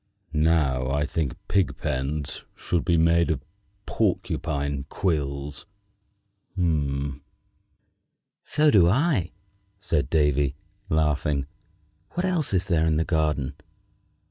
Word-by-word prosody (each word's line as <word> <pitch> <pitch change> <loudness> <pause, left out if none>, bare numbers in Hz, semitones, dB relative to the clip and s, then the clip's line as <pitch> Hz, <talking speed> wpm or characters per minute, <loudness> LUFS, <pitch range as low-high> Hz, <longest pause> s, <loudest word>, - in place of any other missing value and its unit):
Now 75 -5 +2
I 70 +2 +1
think 75 -1 -1
that - - -25
pigpens 75 -6 -1
should 85 -3 -1
be 85 -1 +2
made 85 +1 +4
of 65 - -2 0.4
porcupine 70 -1 -1
quills." 70 -4 -2 0.9
"So 70 -5 0 1.5
do 90 -5 +6
I," 120 - +2 0.5
said 75 -9 0
Davy, 75 -3 +2 0.3
laughing. 75 -2 +1 0.7
"What 180 - -1
else 180 -6 0
is 95 -1 +1
there 80 -3 +2
in 80 -1 +2
the 80 - +1
garden?" 75 -4 0
75 Hz, 100 wpm, -25 LUFS, 70-85 Hz, 1.5 s, do